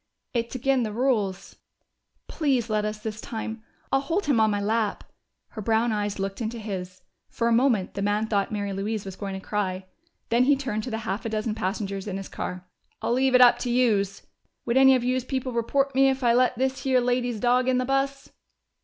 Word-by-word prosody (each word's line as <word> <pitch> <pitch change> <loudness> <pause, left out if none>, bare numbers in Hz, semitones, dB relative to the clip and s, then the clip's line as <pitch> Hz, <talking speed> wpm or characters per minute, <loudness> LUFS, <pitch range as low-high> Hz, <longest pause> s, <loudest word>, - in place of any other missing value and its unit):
"It's 235 0 -2
agin' 265 +1 +1
the 220 -2 -2
rules 210 -5 -1 0.3
" - - -49
"Please 260 -7 0
let 210 0 +1
us 215 0 -3
this 215 0 -6
time! 220 0 -5 0.3
I'll 270 - +4
hold 340 +8 -1
him 280 -6 +2
in 220 0 +4
my 205 -1 0
lap." 215 +1 0 0.5
Her 220 - -7
brown 225 +2 +2
eyes 205 -1 -2
looked 195 +2 -4
into 230 +1 -3
his; 185 -4 -6 0.3
for 235 - -1
a - - +2
moment 235 -6 +2
the 200 - -4
man 205 +2 +1
thought 205 -3 0
Mary 205 -2 -2
Louise 205 +2 -3
was 190 -1 -7
going 195 -1 -5
to - - -17
cry. 190 -3 -2 0.4
Then 240 +1 +3
he 285 +1 +5
turned 260 -6 -3
to - - -4
the 220 - -2
half 195 +5 -2
a 225 - -3
dozen 215 0 -1
passengers 200 -1 -3
in 195 -2 -3
his 195 - -7
car. 180 0 -6 0.3
"I'll - - 0
leave 260 +1 +3
it 250 - +7
up 245 -1 +7
to 250 - -3
youse. 215 -6 +1 0.4
Would 235 - 0
any 265 0 +7
of 250 - 0
youse 255 +1 0
people 260 0 -3
report 270 +4 0
me 270 +1 +5
if 265 0 -2
I 235 -1 +4
let 250 0 +3
this 265 +1 -1
here 260 -2 +3
lady's 245 -2 0
dog 250 +2 +2
in 255 - +2
the 255 - 0
bus?" 275 +1 -1
230 Hz, 220 wpm, -25 LUFS, 205-255 Hz, 0.5 s, it